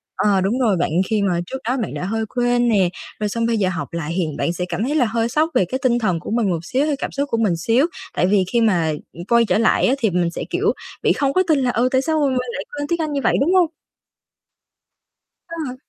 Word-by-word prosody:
ờ, 200 -2 +2
đúng 210 +7 0
rồi 215 -7 +2
bạn, 170 - 0 0.2
khi 215 -2 +1
mà 180 -3 +1
trước 265 - -5
đó 260 - +1
bạn - - -5
đã - - -4
hơi 220 +3 -1
quên 245 0 +2
nè, 195 -5 +3 0.3
rồi 210 -1 -1
xong 230 +2 -1
bây 230 -1 +1
giờ 190 -3 +1
học 165 -6 -5
lại, 165 -1 -3
hiện 165 -5 -2
bạn 170 - 0
sẽ 180 +1 -3
cảm 210 - -2
thấy 285 +5 -1
là 265 - +3
hơi 230 +1 -1
sốc 310 +5 +1
về 185 - +4
cái 260 +9 -3
tinh 240 -2 +3
thần 185 -7 0
của 175 - -7
mình 225 -4 +1
một 170 -1 -2
xíu 270 +7 0
hay 300 -2 0
cảm - - -4
xúc 280 0 -2
của 230 - 0
mình 200 -7 +1
xíu. 235 - +2 0.3
Tại 180 - +1
vì 195 -1 +3
khi 235 - +3
mà, 175 -8 +2 0.2
ừm, 170 +2 -9
quay 235 +2 +4
trở 185 0 +1
lại 225 - +3
á, 260 - +3
thì 220 - +2
mình 175 -1 0
sẽ, - - -5
kiểu, 405 +5 +1 0.3
bị - - +4
không 275 -1 0
có 370 - +3
tin 310 -4 +3
là, 250 -2 +1
ừ, 245 +2 +1
tại 260 0 +3
sao 315 +2 0
mình 260 -2 +1 0.2
lại 285 - -4
quên 290 0 -3
tiếng 340 -1 -1
Anh 305 -2 -2
như 280 - -1
vậy, - - +3
đúng 330 +7 +2
hông? 360 -3 +5 1.8
Ờ. 320 -7 -5
230 Hz, 270 wpm, -20 LUFS, 185-270 Hz, 1.8 s, hông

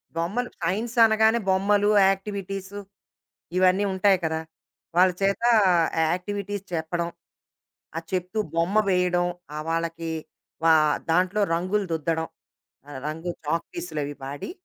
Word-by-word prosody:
బొమ్మలు, 200 +10 -1
సైన్స్ 210 +8 -2
అనగానే 220 +1 +3
బొమ్మలు, 200 +2 +3 0.2
యాక్టివిటీసు 195 0 -4 0.8
ఇవన్నీ 185 +2 +4
ఉంటాయి 190 +1 +4
కదా! 160 0 -1 0.6
వాళ్ళ 185 +1 +6
చేత 195 +2 +1 0.6
ఆ - - +3
యాక్టివిటీస్ 200 +2 -4
చెప్పడం. 170 +1 -2 0.9
ఆహ్, 165 - -5
చెప్తూ 185 +3 -2 0.2
బొమ్మ 170 +4 +1
వేయడం, 180 -1 +2 0.3
ఆ - - -4
వాళ్ళకి 165 0 -2 0.5
వ - - 0 0.5
దాంట్లో 185 +5 +2
రంగులు 185 +4 0
దుద్దడం. 160 0 -1 0.6
ఆ - - -13 0.2
రంగు 160 +3 -4 0.2
చాక్‌పీసులవి 155 -2 -3
వాడి, 140 +1 -6
180 Hz, 110 wpm, -25 LUFS, 165-200 Hz, 0.9 s, వాళ్ళ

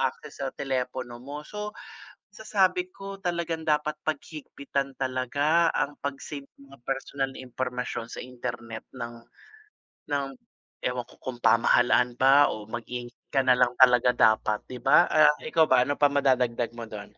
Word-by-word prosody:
access - - -3
sa - - -1
telepono 125 -2 -3
mo 145 +3 -8
so, 210 +4 -6 0.6
masasabi 185 -4 +1
ko 195 +1 -8
talagang 170 -2 -2
dapat 150 0 +1
paghigpitan 140 -2 -4
talaga 140 +6 +1
ang 145 +1 -1
'pag-save 140 0 -5 0.2
ng 140 - -16
mga 140 0 -16
personal 135 0 -3
na - - -11
impormasyon 125 -2 -4
sa - - -7
internet 120 -2 -6
ng 120 -2 -8 0.9
ng 140 -1 +1 0.6
ewan 125 -1 -1
ko - - -17
kung 120 -2 -7
pamahalaan 120 +1 +4
ba 135 +3 +5
o 105 0 -9
mag-ingat 120 +1 -6 0.2
ka 135 - +4
na 125 -1 +4
lang 125 -1 +3
talaga 125 -1 +6
dapat 110 -2 +3
'di 125 - -6
ba. 135 +4 +5
Ah, 150 -1 +6
ikaw 160 +5 +3
ba, 130 -4 +4
ano 145 +3 0
pa 145 - +4
madadagdag 125 -4 +1
mo 115 - -5
do'n? 105 -2 -10
130 Hz, 155 wpm, -27 LUFS, 120-150 Hz, 0.9 s, talaga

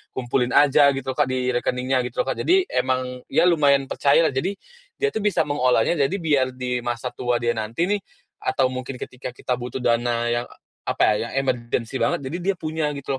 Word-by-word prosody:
kumpulin 125 0 0
aja 145 0 +6
gitu 135 0 -3
loh 130 - -9
Kak 145 - +4
di 130 -1 -1
rekeningnya 125 +1 0
gitu 120 - -8
loh, - - -16
Kak. - - -5
Jadi 375 +2 +4
emang 130 0 +1 0.3
ya - - +4
lumayan 145 -5 +4
percaya 140 -1 +3
lah, 155 - +2
jadi 170 +9 0 0.4
dia 430 - 0
tuh - - -2
bisa 210 -1 +1
mengolahnya, 145 +1 +1
jadi 185 - -3
biar 150 -8 +2
di 125 -1 -2
masa 120 +1 -3
tua 125 -1 -1
dia 120 0 +1
nanti 115 +6 -2
nih, 205 +3 +1 0.4
atau 130 -1 +1
mungkin 130 +1 -5
ketika 125 0 -7
kita 125 -1 -2
butuh 125 +1 -5
dana 120 0 +1
yang, 120 +1 -1 0.4
apa - - +1 0.2
ya, 115 - -5
emergency 125 -2 -1
banget, - - 0
jadi 135 +6 -4
dia 190 +2 0
punya 155 -3 -2
gitu 140 0 -5
130 Hz, 200 wpm, -23 LUFS, 125-145 Hz, 0.4 s, aja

